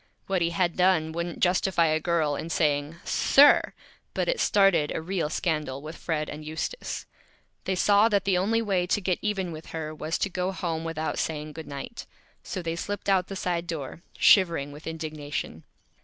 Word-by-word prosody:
What 190 -2 0
he 170 - +2
had 170 0 0
done 180 -4 +3
wouldn't 170 +1 -4
Justify 180 -1 +3
a 155 0 +2
Girl 160 -3 +1
in 160 - -5
saying, 150 -1 0
"Sir!" 285 +1 +5 0.4
but - - 0
it - - 0
started 195 -7 +3
a - - -1
Real 170 -1 -2
Scandal 150 -5 -1
with 155 +3 -8
Fred 155 -3 -2
and 150 +1 -7
Eustace. 160 - -4 0.6
They 190 - 0
saw 205 +4 +4
that 200 -3 +1
the 195 -2 +2
Only 220 +5 +1
Way 190 -4 0
to 195 - +1
Get 185 -2 -1
Even 195 -4 -1
with 160 0 -9
her 155 -1 -5
was 155 +1 -3
to - - 0
go 180 +1 -1
Home 165 -4 -3
without 160 -1 -3
saying 150 -1 -3
"Good 160 +1 -8
Night." 140 - -7 0.3
So 185 - -5
they 165 0 -2
slipped 200 +3 -4
out 185 -2 +3
the 195 - -6
Side 175 -2 -2
Door, 160 -2 -5 0.2
shivering 170 -8 +4
with 150 +2 -11
Indignation. 155 - -5
170 Hz, 185 wpm, -27 LUFS, 155-190 Hz, 0.6 s, Sir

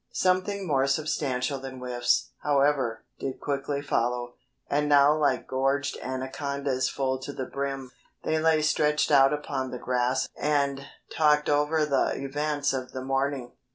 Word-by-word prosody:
Something 185 +2 +1
more 135 -5 +2
substantial 140 -2 -1
than 130 0 -8
whiffs, 125 -1 0
however, 140 -5 +1 0.2
did 135 - -4
quickly 140 0 -2
follow, 120 -2 -1 0.3
and 150 +1 0
now 145 +1 +6
like 145 -4 +1
gorged 135 +1 0
anacondas 130 0 -2
full 130 -1 -1
to 130 - -6
the 130 -2 -4
brim, 135 -2 -4 0.3
they 155 0 +1
lay 160 -1 +3
stretched 150 0 +2
out 135 -1 +6
upon 140 -3 -3
the 125 - -5
grass 125 +1 0
and 140 -2 0 0.3
talked 150 -1 +3
over 150 +2 +2
the 140 -3 +1
events 145 +1 -1
of 130 -1 -4
the 130 - -5
morning. 135 -2 -1
140 Hz, 145 wpm, -27 LUFS, 130-150 Hz, 0.3 s, now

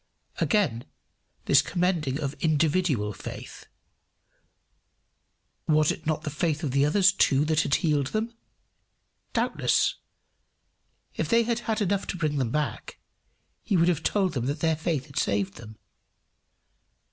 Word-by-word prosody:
Again 185 - +1 0.6
this - - +5
commending 170 -6 -1
of 140 -2 -3
individual 155 - +1
faith! - - -9 2.0
"Was 155 -1 +3
it 160 - -7
not 155 -1 -1
the 150 - -4
faith 155 +1 -1
of 145 - -1
the 140 +1 +2
others 195 +4 +4
too 145 -7 +2
that 155 0 +2
had 140 - +1
healed 150 -6 +1
them?" 220 - -2 1.0
Doubtless. - - +1 1.2
If - - -3
they 230 0 +4
had 235 0 -1
had 220 0 0
enough 200 0 -1
to 180 - -4
bring 155 -4 -1
them 125 -4 0
back, 150 +4 -3 0.6
he 200 - 0
would 170 +1 +4
have 165 -4 0
told 190 +2 +1
them 125 -2 -2
that 145 +2 -2
their 160 -1 +2
faith 155 -3 -2
had 140 - -4
saved 100 -1 -1
them. 110 -2 -11
155 Hz, 140 wpm, -26 LUFS, 140-180 Hz, 2.0 s, this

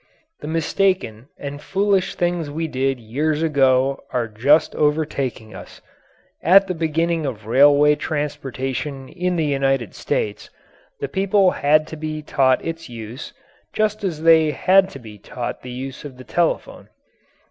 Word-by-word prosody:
The - - -8
mistaken 165 - 0
and 145 0 -7
foolish 195 +3 0
things 175 -3 -1
we 160 +3 -3
did 135 -2 -1
years 150 +8 -1
ago 135 -3 +2
are 120 -2 -1
just 130 +9 +3
overtaking 145 -7 -1
us. - - -11 0.6
At 195 +4 +6
the 185 - -3
beginning 165 -1 -1
of 110 -6 -6
railway 145 +5 +5
transportation 140 -2 -4
in 180 0 -2
the 160 -2 0
United 135 -6 0
States, 105 0 -3 0.5
the 140 - -1
people 190 +3 +2
had 155 +2 +2
to 160 - -9
be 155 0 -5
taught 130 -3 +2
its 165 -2 -5
use, 115 +2 -8 0.4
just 215 0 0
as 165 -5 -3
they 160 -1 +6
had 190 +5 +3
to - - -10
be 110 -5 -12
taught 120 +4 -6
the 125 - -9
use 130 +2 -7
of 140 -4 -9
the 130 - -11
telephone. 170 -1 -2
150 Hz, 145 wpm, -21 LUFS, 130-165 Hz, 0.6 s, At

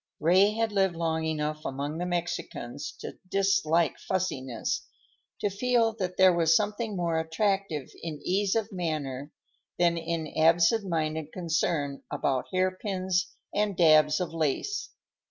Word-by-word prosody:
Ray 190 +6 +4
had 225 0 0
lived 195 -3 +2
long 160 -1 -1
enough 155 -1 -2
among 145 +4 -3
the 180 - -2
Mexicans 170 -6 -4
to - - -8
dislike 195 -4 +2
fussiness, 135 -11 -2 0.5
to 205 - +1
feel 230 +2 +2
that 180 -1 -3
there 185 -1 +7
was 165 -1 +4
something 210 +2 0
more 170 -2 0
attractive 165 -2 -1
in 160 -3 -5
ease 195 +2 +1
of 225 -1 -1
manner 150 -6 -3 0.5
than 170 -1 +3
in 165 -2 -3
absentminded 165 -3 +2
concern 160 -5 -1
about 130 -2 -1
hairpins 185 0 0 0.3
and 205 -3 0
dabs 155 -3 +5
of 180 -2 -3
lace. 165 - -1
170 Hz, 130 wpm, -28 LUFS, 155-195 Hz, 0.5 s, there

